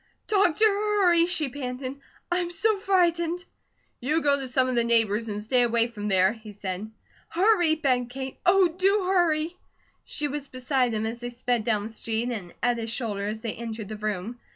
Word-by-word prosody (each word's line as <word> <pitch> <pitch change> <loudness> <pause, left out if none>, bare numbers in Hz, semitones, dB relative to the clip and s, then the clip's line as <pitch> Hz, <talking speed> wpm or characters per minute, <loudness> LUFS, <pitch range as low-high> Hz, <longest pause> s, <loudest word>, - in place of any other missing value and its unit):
"Doctor, 405 -1 +3
hurry!" 400 -5 +3
she 340 -5 0
panted. 255 0 -5 0.4
"I'm 350 0 0
so 405 +5 +1
frightened." 350 -2 +1 0.5
"You 305 +6 0
go 280 -1 +3
to 270 - -4
some 255 0 +2
of 255 - -1
the 235 -1 +3
neighbours, 225 -1 +2
and 210 0 -4
stay 245 +3 +3
away 235 -1 +3
from 215 -3 -6
there," 190 0 +3
he 220 -2 -11
said. 200 +1 -5 0.4
"Hurry!" 350 -3 +3
begged 255 -6 0
Kate. 265 +1 -6
"Oh, 375 0 +5
do 380 +3 +1
hurry!" 335 -2 +2 0.5
She 295 - -3
was 290 0 -5
beside 255 -2 0
him 215 0 -1
as 230 +2 -4
they 245 0 -5
sped 240 -2 -1
down 215 -3 +1
the 215 - -5
street, 225 +2 -2
and 195 -7 -5
at 245 -1 +2
his 225 0 -4
shoulder 210 -4 -2
as 215 +1 -4
they 225 -2 -3
entered 225 -2 -6
the 215 - -5
room. 215 +2 -4
250 Hz, 190 wpm, -26 LUFS, 225-340 Hz, 0.5 s, Oh